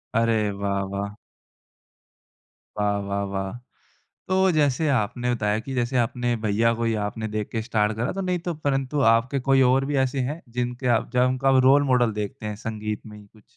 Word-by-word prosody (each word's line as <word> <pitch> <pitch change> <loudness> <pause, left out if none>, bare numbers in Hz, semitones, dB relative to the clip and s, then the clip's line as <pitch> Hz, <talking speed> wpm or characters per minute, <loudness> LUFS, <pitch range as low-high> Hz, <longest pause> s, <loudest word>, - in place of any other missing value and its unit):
अरे 115 -2 +2
वाह, 100 0 -2
वाह! 100 +1 -4 1.6
वाह! 105 -1 +1
वाह! 100 0 -2
वाह! 95 0 -2 0.8
तो 185 - +1 0.2
जैसे 145 +1 +2
आपने 120 +3 -1
बताया 105 -2 0
कि 135 +4 -7
जैसे 125 +1 0
आपने 120 0 0
भैया 110 +2 +2
को 115 0 -2
या 110 -2 0
आपने 110 +2 -4
देख 105 -1 -3
के 115 - -2
स्टार्ट 110 -2 0
करा 120 +3 -1
तो - - -1
नहीं 180 -1 0
तो 175 - 0
परंतु 135 +1 0
आपके 130 +4 0
कोई 135 0 +5
और 135 +1 +2
भी 145 +1 -2
ऐसे 130 +1 -3
हैं 155 +3 -6 0.2
जिनके 125 +1 -2
आप - - -6
जब 125 0 +4
उनका 135 +1 +2
रोल 145 +1 +5
मॉडल 125 -3 +3
देखते 105 +1 -6
हैं 105 0 -3
संगीत 105 -1 -4
में 105 -1 -10
ही 105 - -14
कुछ? 105 +1 -22
115 Hz, 190 wpm, -24 LUFS, 105-130 Hz, 1.6 s, कोई